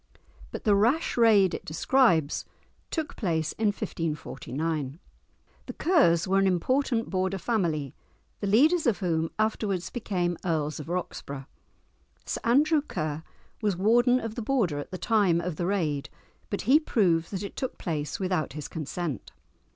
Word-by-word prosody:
But - - -7
the 210 - +4
rash 235 +11 +2
raid 215 -6 +5
it - - -4
describes 165 - +2 0.5
took 320 -3 -3
place 160 -7 -1
in 220 - -1
1549. 155 -5 -3 0.7
The - - -5
Kers 200 - +3
were 195 +1 +3
an 195 - +3
important 235 +6 +1
Border 190 0 0
family, 170 - -1 0.5
the 200 - -2
leaders 295 - +4
of 230 - +3
whom 165 -4 0
afterwards 215 -4 -1
became 180 -7 -2
Earls 155 -4 -1
of 150 - -8
Roxburgh. 145 -6 -4 0.8
Sir - - -3
Andrew 295 +6 +4
Ker 155 - -4 0.4
was 205 -5 0
warden 240 +6 +4
of 225 -2 -5
the 235 - -5
Border 215 - 0
at 145 - -7
the 185 - -5
time 200 -6 +2
of 170 -2 -4
the 175 - -1
raid, 155 -8 -1 0.4
but 200 - -2
he 270 +8 +5
proved 175 - +1
that 195 -1 -4
it 200 - -7
took 260 - -4
place 150 -4 -3
without 180 -7 -1
his 150 -1 -6
consent. 155 - -5
190 Hz, 150 wpm, -27 LUFS, 160-225 Hz, 0.8 s, raid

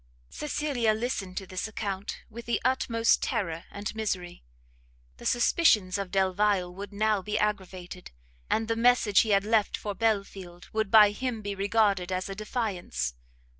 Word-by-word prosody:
Cecilia 275 -7 0
listened 215 -5 -3
to 195 - -3
this 185 +2 -4
account 200 -2 -5
with 235 +1 -10
the 235 - +1
utmost 230 -3 +2
terror 175 -9 -2
and 205 +1 -5
misery; 190 -5 -3 0.8
the - - -4
suspicions 215 - +3
of 195 -2 -3
Delvile 190 -1 +1
would 200 +2 -8
now 210 0 +1
be 210 +2 -2
aggravated, 185 -4 -3 0.4
and 225 0 +1
the 225 - 0
message 230 -3 +4
he 220 - +2
had 200 -1 +4
left 215 0 +1
for 205 - -4
Belfield, 195 -5 -2
would 220 -2 0
by 210 -1 +7
him 230 0 -4
be 205 0 -3
regarded 200 -2 +1
as 185 +1 -2
a - - -3
defiance. 210 - -3
205 Hz, 155 wpm, -28 LUFS, 190-225 Hz, 0.8 s, by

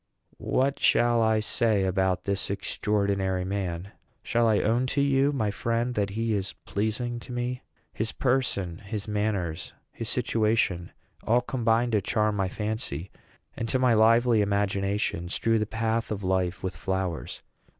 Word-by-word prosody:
What 135 +2 0
shall 120 -1 +4
I 110 -1 +3
say 110 -2 +2
about 95 -1 +1
this 100 0 -1
extraordinary 100 -2 -1
man? 95 -1 -3 0.3
Shall 120 0 +2
I 110 -2 +3
own 120 +4 +1
to - - +5
you, 140 0 +3
my 110 -7 0
friend, 115 +4 -1
that 105 -3 0
he 115 +2 -1
is 100 -1 -2
pleasing 115 +4 -2
to 120 - -10
me? 125 +1 -3 0.3
His 110 +1 -1
person, 120 -10 0
his 105 0 -5
manners, 100 -6 -2 0.2
his - - -5
situation, 105 -6 +1 0.3
all 120 +2 +3
combine 120 -1 +1
to 105 -2 +2
charm 105 +1 +1
my 95 -2 0
fancy, 105 - -4 0.4
and, 115 -1 -3
to 130 - +2
my 125 -2 +3
lively 115 +1 +5
imagination, 100 -3 0
strew 115 +4 +1
the 105 - -1
path 115 +1 -1
of 100 -2 -4
life 95 -1 0
with 95 0 -3
flowers. 95 -3 -3
105 Hz, 150 wpm, -27 LUFS, 95-115 Hz, 0.4 s, to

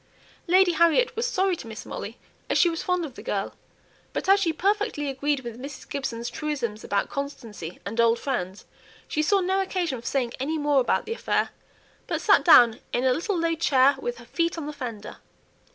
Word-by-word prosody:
Lady 370 +1 +5
Harriet 340 +8 +3
was 460 +2 0
sorry 385 -5 +1
to 240 - -10
miss 220 - -8
Molly, - - -7 0.3
as - - +2
she 345 - +4
was 330 - -4
fond 360 -2 0
of 280 - -9
the - - -10
girl; - - -3 0.6
but - - -3
as 390 +1 +6
she 350 -5 +1
perfectly 390 -3 0
agreed 280 +1 -1
with 240 -1 -8
Mrs. 280 +2 -8
Gibson's 235 -4 -4
truism 280 -7 -3
about 200 0 0
"constancy" 230 - -6
and 225 +4 0
"old 230 0 +4
friends," 195 -9 -4 0.4
she 305 - 0
saw 390 +6 +3
no 380 +2 +1
occasion 350 -10 -2
for - - -8
saying 250 -4 -1
any 305 +5 -1
more 290 -2 +3
about 245 - 0
the 455 - -3
affair, - - 0 0.6
but - - -1
sat - - +4
down 240 -9 +7
in 245 - 0
a 260 -1 +4
little 360 - -1
low 335 0 +1
chair 275 -3 +4
with 485 +1 -4
her - - -13
feet 335 0 -1
on 320 - -4
the 300 - -5
fender. 235 -7 -7
290 Hz, 200 wpm, -25 LUFS, 245-350 Hz, 0.6 s, down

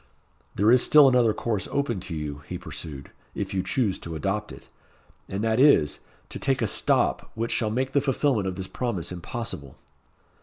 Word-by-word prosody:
"There 105 +4 +4
is 125 0 +6
still 150 -2 +7
another 125 -4 +4
course 105 -3 -2
open 135 -7 -1
to 90 -2 -6
you," 75 -2 -5
he - - -4
pursued, 70 -3 -8 0.2
"if - - -4
you 95 - +1
choose 105 0 0
to 85 -1 -7
adopt 100 +7 -2
it; - - -12 0.6
and 100 +2 -3
that 110 +1 +1
is, 130 - +5 0.3
to - - -7
take 135 -3 +1
a - - +3
stop 105 - +1
which 115 +1 -2
shall 110 - 0
make 130 +4 -1
the 140 - +2
fulfilment 135 -6 +1
of 95 - -3
this 95 0 -4
promise 100 -5 -3
impossible." 90 - -6
110 Hz, 185 wpm, -25 LUFS, 90-125 Hz, 0.6 s, still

